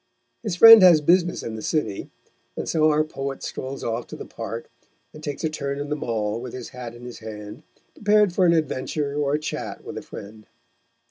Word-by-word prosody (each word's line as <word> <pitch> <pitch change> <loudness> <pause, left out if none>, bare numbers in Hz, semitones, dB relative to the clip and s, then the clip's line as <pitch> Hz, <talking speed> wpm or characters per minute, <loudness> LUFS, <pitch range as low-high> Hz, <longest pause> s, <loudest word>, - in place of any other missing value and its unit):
His 210 -6 -3
friend 225 +3 +10
has 175 -4 +8
business 175 +3 +2
in 115 - -5
the 110 - -6
city, 110 -11 -2 0.5
and - - -4
so 155 -1 +3
our 155 0 +3
poet 135 -3 -6
strolls 135 +1 -6
off 115 +1 -3
to - - -8
the - - -8
Park, 115 +3 -7 0.5
and 155 - -12
takes 145 +1 -5
a - - +2
turn 140 -2 -4
in 145 0 -5
the 150 - -1
Mall 115 -5 -2
with 125 -1 -7
his 125 -2 -7
hat 125 -2 -8
in 120 - -13
his 125 - -9
hand, 105 0 -9 0.3
prepared 210 -2 +3
for 185 0 +3
an 170 - +5
adventure 145 -2 -1
or 145 -1 0
a 150 - +1
chat 155 - -5
with - - -6
a - - -10
friend. 105 +1 -11
140 Hz, 210 wpm, -23 LUFS, 115-160 Hz, 0.5 s, friend